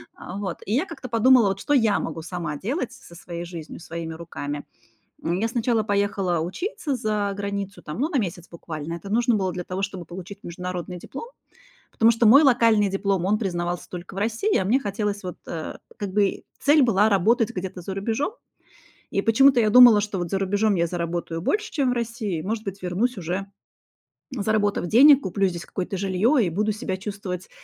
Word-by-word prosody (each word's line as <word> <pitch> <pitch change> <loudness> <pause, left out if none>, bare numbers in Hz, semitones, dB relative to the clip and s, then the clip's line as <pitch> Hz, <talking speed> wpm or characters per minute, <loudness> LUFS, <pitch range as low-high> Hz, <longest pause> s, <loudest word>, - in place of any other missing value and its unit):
А, 185 +3 -8
вот, 190 -4 -4
и 210 - -2
я 285 +9 +2
как-то 320 -7 -8
подумала, 240 0 +5
вот 195 0 -3
что 290 - -1
я 225 -6 +3
могу 165 - -4
сама 170 -4 -4
делать 250 - -3
со 265 -7 -15
со 170 - -12
своей 170 -1 -6
жизнью, 170 -3 -8
своими 165 -1 -6
руками. 145 -3 -6 0.6
М, 175 +3 0
я 225 - +1
сначала 235 -1 +1
поехала 200 -4 0
учиться 280 - -3
за 210 -4 -1
границу 200 -1 -4
там, 150 - -7
ну, 310 - +1
на 290 - 0
месяц 180 -5 -3
буквально, 165 -1 -6
это 195 +4 -9
нужно 240 +1 +2
было 190 -2 0
для 180 -1 -4
того, 185 +2 -4
чтобы 190 -3 -4
получить 190 +4 -9
международный 180 +1 -5
диплом, 275 - -8 0.6
потому 230 +1 +4
что 230 0 +2
мой 275 +8 +8
локальный 230 -5 +4
диплом, 195 -2 0
он 210 +2 +2
признавался 175 -3 -3
только 180 +1 -8
в 195 - -5
России, 230 - 0
а - - +1
мне 225 +8 +3
хотелось 205 -2 -3
вот, 180 - -5
э, 160 -2 -5 0.2
как 200 -5 -5
бы 200 -1 +1 0.2
цель 290 0 +5
была 215 -3 +4
работать 220 +4 +3
где-то 185 -4 -5
за 190 +2 -5
рубежом. 225 - -2 0.8
И 195 - +1
почему-то 250 +4 +5
я 215 - +3
думала, 240 -3 +9
что 205 -2 -3
вот 175 -1 -3
за 195 - 0
рубежом 200 +1 +1
я 170 - +2
заработаю 170 -1 -3
больше, 425 - -1
чем 275 -5 +1
в - - +1
России, 230 -6 -3
и, - - -4
может 215 +4 -3
быть, 195 -1 -6
вернусь 200 +6 -1
уже, 180 +3 -3 0.9
заработав 205 -5 0
денег, 275 - +7
куплю 195 -1 0
здесь 170 -2 -5
какое-то 190 +1 -4
жилье, 195 +8 +2
и - - 0
буду 210 +6 0
себя 195 -3 -3
чувствовать, 190 -2 -6
200 Hz, 200 wpm, -24 LUFS, 180-230 Hz, 0.9 s, думала